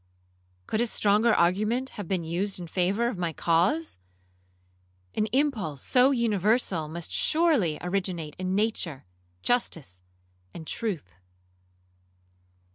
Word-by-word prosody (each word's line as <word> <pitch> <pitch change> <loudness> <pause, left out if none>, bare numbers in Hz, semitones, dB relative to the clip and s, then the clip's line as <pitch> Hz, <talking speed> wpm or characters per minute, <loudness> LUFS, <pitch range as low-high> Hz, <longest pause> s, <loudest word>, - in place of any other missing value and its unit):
Could 215 - 0
a 240 - +2
stronger 215 +2 +3
argument 215 +9 +2
have 205 -4 -7
been 185 -2 -1
used 180 +5 -2
in 175 - -6
favour 190 +7 +1
of 225 -6 -3
my 170 -2 -1
cause? 165 - +1 1.1
An 215 - 0
impulse 220 - 0
so 255 +1 +4
universal 215 - +1
must 170 +2 -5
surely 295 - +2
originate 180 -4 -2
in 185 0 -1
nature, 200 - -1 0.4
justice, 155 - -1 0.5
and 160 - -7
truth.' 165 - -3
190 Hz, 115 wpm, -27 LUFS, 165-225 Hz, 1.1 s, so